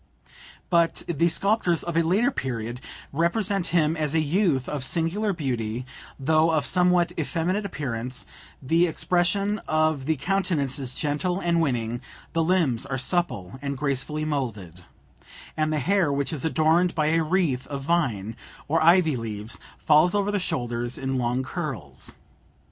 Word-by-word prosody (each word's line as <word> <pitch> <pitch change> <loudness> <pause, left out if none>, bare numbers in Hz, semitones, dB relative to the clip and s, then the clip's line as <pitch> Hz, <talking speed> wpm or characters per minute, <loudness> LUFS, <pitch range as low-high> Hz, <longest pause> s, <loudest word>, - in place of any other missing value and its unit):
But 170 -1 +2
the 170 0 +2
sculptors 175 0 +2
of 170 -1 -4
a 165 - +4
later 200 - +2
period 120 - -4 0.3
represent 190 +4 0
him 160 -2 +2
as 155 -1 -1
a - - +4
youth 155 -3 +1
of 145 -3 -3
singular 175 +9 0
beauty, 125 - -3 0.3
though 155 +4 +3
of 155 -3 +1
somewhat 180 0 +3
effeminate 180 +6 -1
appearance; 130 -6 -4 0.4
the 165 +6 +3
expression 190 +5 +1
of 155 -3 +1
the 160 - +2
countenance 155 -5 0
is 130 -2 -1
gentle 155 +5 -1
and 170 -2 +1
winning; 120 -5 -1 0.3
the 165 - +2
limbs 160 -9 +1
are 135 - -2
supple 130 - 0
and 140 -1 -3
gracefully 145 +2 -2
moulded; 105 - -4 0.7
and 155 0 0
the 155 - 0
hair, 180 +2 +2
which 140 +3 -1
is 150 - -2
adorned 160 +2 +2
by 155 -1 +2
a 165 +1 +3
wreath 155 -6 0
of 140 -2 -5
vine 125 - 0 0.3
or 160 +2 +2
ivy 165 -2 +5
leaves, 110 -2 -5 0.2
falls 155 +5 +4
over 205 0 +1
the 205 - 0
shoulders 120 -6 -2
in 135 -1 -2
long 125 +2 0
curls. 130 - -5
155 Hz, 150 wpm, -25 LUFS, 130-175 Hz, 0.7 s, ivy